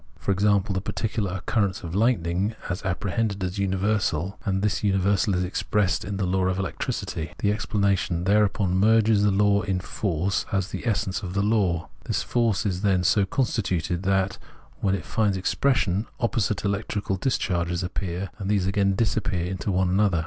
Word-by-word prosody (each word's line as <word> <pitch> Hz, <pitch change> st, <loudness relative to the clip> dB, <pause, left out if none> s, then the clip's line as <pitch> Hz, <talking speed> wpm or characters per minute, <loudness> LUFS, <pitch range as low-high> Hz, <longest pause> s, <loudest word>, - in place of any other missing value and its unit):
For -, -, -2 dB
example, 100 Hz, +1 st, +2 dB
the 95 Hz, -, -1 dB
particular 105 Hz, -1 st, -2 dB
occurrence 95 Hz, +1 st, -1 dB
of 85 Hz, -, -5 dB
hghtning 100 Hz, -2 st, +1 dB, 0.2 s
is 90 Hz, -, -3 dB
apprehended 100 Hz, +2 st, -1 dB
as 90 Hz, +2 st, -3 dB
universal, 100 Hz, -2 st, 0 dB
and 95 Hz, -1 st, -1 dB
this 105 Hz, -1 st, 0 dB
universal 100 Hz, 0 st, +2 dB
is 90 Hz, -, +1 dB
expressed 95 Hz, +1 st, 0 dB
as 100 Hz, -, -4 dB
the 100 Hz, 0 st, -1 dB
law 95 Hz, +1 st, +1 dB
of 95 Hz, 0 st, 0 dB
electricity; 85 Hz, -4 st, -3 dB
the 100 Hz, -, +1 dB
explanation 100 Hz, -5 st, 0 dB
thereupon 100 Hz, -1 st, +2 dB
merges 110 Hz, +1 st, +4 dB
the 105 Hz, -, +4 dB
law 100 Hz, +1 st, +3 dB
in 95 Hz, -3 st, -1 dB
force 95 Hz, -1 st, -1 dB
as 95 Hz, -2 st, 0 dB
the -, -, -5 dB
essence 105 Hz, -2 st, 0 dB
of 95 Hz, -2 st, -6 dB
the 100 Hz, -, +2 dB
law. 100 Hz, -6 st, +1 dB, 0.2 s
This -, -, -1 dB
force 115 Hz, -3 st, +1 dB
is, 95 Hz, -3 st, -1 dB
then, 95 Hz, -3 st, +2 dB
so 100 Hz, +3 st, +3 dB
constituted 95 Hz, -, -1 dB
that, 95 Hz, 0 st, 0 dB, 0.4 s
when 100 Hz, -1 st, +1 dB
it 95 Hz, -, -6 dB
finds 105 Hz, -3 st, +1 dB
expression, 105 Hz, -1 st, +1 dB
opposite 110 Hz, -3 st, 0 dB
electrical 100 Hz, -1 st, -1 dB
dis 125 Hz, +8 st, 0 dB
charges 85 Hz, -1 st, -1 dB
appear, 90 Hz, 0 st, -4 dB
and 100 Hz, -1 st, -3 dB
these 100 Hz, -3 st, +2 dB
again 100 Hz, 0 st, +2 dB
disappear 95 Hz, -5 st, 0 dB
into 95 Hz, +2 st, -3 dB
one 95 Hz, 0 st, +2 dB
another. 95 Hz, -2 st, +3 dB
100 Hz, 170 wpm, -25 LUFS, 95-105 Hz, 0.4 s, merges